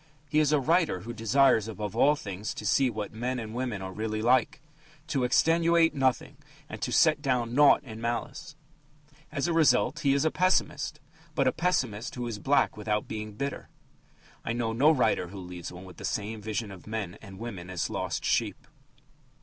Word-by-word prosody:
He 150 +2 +2
is 150 -1 +3
a 150 - +4
writer 160 - +1
who 120 +4 -7
desires 115 0 +3
above 105 -1 -5
all 145 +5 +4
things 105 -5 -6
to - - -7
see 135 -2 +3
what 105 -3 -5
men 125 +3 -2
and 110 -2 -6
women 120 -5 -3
are 95 - -5
really 110 +1 -3
like 125 +4 +2 0.5
to 140 -5 -1
extenuate 165 +5 +3
nothing 135 +1 0 0.3
and 150 - -8
to - - -2
set 155 -3 +4
down 125 -4 0
naught 145 +2 +6
in 115 -3 -9
malice. 135 +7 -4 0.8
As 140 - -1
a 170 - 0
result, 160 -1 +3
he 140 -3 +2
is 140 - +1
a 160 - +2
pessimist, 155 -5 0 0.4
but 135 -2 +2
a - - +4
pessimist 130 - -1
who 125 -1 -4
is 115 -3 -4
black 140 +6 +2
without 105 0 -2
being 110 -1 -5
bitter. 140 +6 -5 0.7
I 115 - -2
know 115 -1 -1
no 135 +7 +4
writer 125 - +2
who 100 +3 -10
leaves 90 -2 -7
one 90 +1 -10
with 90 - -13
the - - -10
same 110 +1 -3
vision 110 0 -3
of 95 0 -12
men 105 -4 -4
and 100 -3 -11
women 95 -6 -7
as 90 -2 -2
lost - - -3
sheep. - - 0
120 Hz, 190 wpm, -28 LUFS, 105-145 Hz, 0.8 s, naught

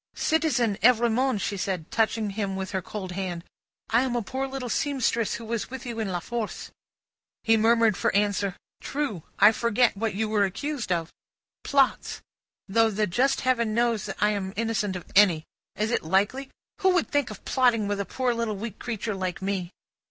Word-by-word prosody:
"Citizen 285 -10 +1
Evrémonde," 240 0 +3
she 200 - -2
said, 185 -4 -3
touching 220 -2 +1
him 195 -1 -2
with 190 0 -4
her 190 -1 -1
cold 190 0 -6
hand. 180 -2 -4 0.5
"I 230 +2 +5
am 255 -2 -1
a 240 - 0
poor 265 +5 -3
little 265 -2 -5
seamstress, 250 -4 0
who 230 - -7
was 230 0 -3
with 265 0 -7
you 235 -2 -5
in 220 - -1
La 175 - -1
Force." 230 +4 -5 0.7
He 225 - +4
murmured 225 -1 +4
for - - +1
answer: 200 -2 +1 0.3
"True. 275 - -3 0.2
I 205 +2 +8
forget 235 +1 +2
what 215 0 -2
you 220 +2 0
were 210 -1 +2
accused 245 +4 -3
of?" 165 -2 -1 0.5
"Plots. 275 -2 +1 0.5
Though 225 +3 +3
the 210 0 0
just 250 +9 +1
Heaven 235 -4 +1
knows 235 -3 +1
that - - -5
I 210 - +3
am 195 -2 -3
innocent 215 -3 -1
of 180 - -6
any. 185 -6 +5 0.3
Is 215 +2 -1
it - - +1
likely? 200 +11 0 0.3
Who 375 -1 +3
would 350 - +1
think 290 -4 +1
of 215 - -10
plotting 240 -5 +2
with 205 0 -1
a - - 0
poor 255 +2 -1
little 230 -2 -2
weak 215 +1 -6
creature 225 -2 -3
like 185 -2 -3
me?" 190 -2 -2
220 Hz, 190 wpm, -26 LUFS, 195-240 Hz, 0.7 s, I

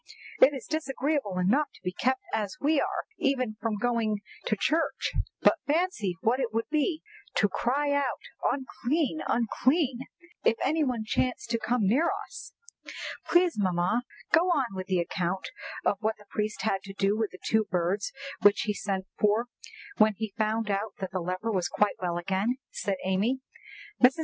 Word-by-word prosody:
"It 280 - +8
is 260 - -6
disagreeable 280 -8 -1
enough 235 +12 +3
to - - -18
be 180 - -1
kept 260 +7 0
as 215 +4 -1
we 290 0 +3
are - - -1 0.2
even 255 -5 +1
from 225 -2 -1
going 220 -2 0 0.3
to 215 - +2
church, 320 +11 +1 0.3
but - - +5
fancy 290 - +1
what 240 +4 +2
it 245 -4 -1
would 225 +1 -1
be 310 +1 +1 0.3
to - - +3
have - - +2
to - - -5
cry 285 +4 +1
out 285 -3 0 0.3
'Unclean! 280 +3 -1
unclean!' 255 +3 +1 0.4
if - - +4
any 310 +4 +2
one 250 -5 -1
chanced 240 +1 -1
to 230 - +1
come 240 +1 0
near 280 - +3 0.2
us!" - - -9 0.8
"Please, 350 -7 +3
mamma, 185 +4 +2 0.3
go 340 +3 +5
on 270 - +1
with 185 0 -5
the 185 - +1
account 180 +2 -2 0.4
of 200 - +3
what 220 +1 0
the 210 - -17
priest 215 0 -2
had 195 -3 +1
to 195 - -7
do 195 +1 +2
with 220 -1 0
the 185 - -12
two 220 -1 +3
birds 180 +2 0 0.3
which 205 0 +6
he 210 - 0
sent 195 -2 -2
for 215 +3 +2 0.5
when 215 -1 +5
he 220 -2 -4
found 220 0 +1
that 200 -1 +1 0.3
the 185 - -1
leper 185 +6 -2
was 185 -4 +1
quite 210 -1 +1
well 175 -1 -1
again," 195 +7 0
said 200 -1 -1
Amy. 205 +8 +1 0.6
Mrs. 260 +5 +6
225 Hz, 175 wpm, -28 LUFS, 200-265 Hz, 0.8 s, It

